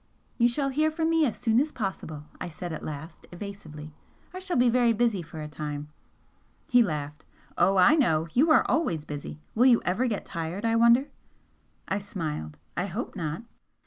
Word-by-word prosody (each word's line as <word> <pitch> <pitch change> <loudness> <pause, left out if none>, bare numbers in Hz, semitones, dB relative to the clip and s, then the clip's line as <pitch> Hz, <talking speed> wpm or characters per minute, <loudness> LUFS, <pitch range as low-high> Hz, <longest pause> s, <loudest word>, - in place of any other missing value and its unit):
"You 240 - +6
shall 275 +3 0
hear 305 +4 +2
from 320 +1 0
me 325 -2 +4
as 230 - -4
soon 230 0 +2
as 300 +1 -1
possible," 190 - -4 0.2
I 180 - -3
said 170 +1 -6
at 155 - -5
last, 155 +2 -8
evasively 170 -6 -8 0.4
"I 370 - -5
shall 370 -4 -2
be 245 0 +5
very 240 -1 +4
busy 225 -4 +1
for 160 -1 -9
a - - -5
time 150 0 -5 0.4
" - - -39
He 245 - +7
laughed. 150 -6 -2 0.3
"Oh, 195 0 +3
I 185 +11 +7
know! 165 - +2
You 295 +7 +4
are 310 - +6
always 170 - 0
busy! 145 0 -7
Will 245 +4 +5
you 240 -3 +6
ever 205 +9 +1
get 210 -4 -2
tired, 170 +4 -4
I 225 0 +2
wonder?" 235 +4 +5 0.8
I 195 - 0
smiled. 155 - -5 0.2
"I 180 +3 -1
hope 205 +7 -5
not!" 160 +4 -3
195 Hz, 190 wpm, -27 LUFS, 155-245 Hz, 0.8 s, He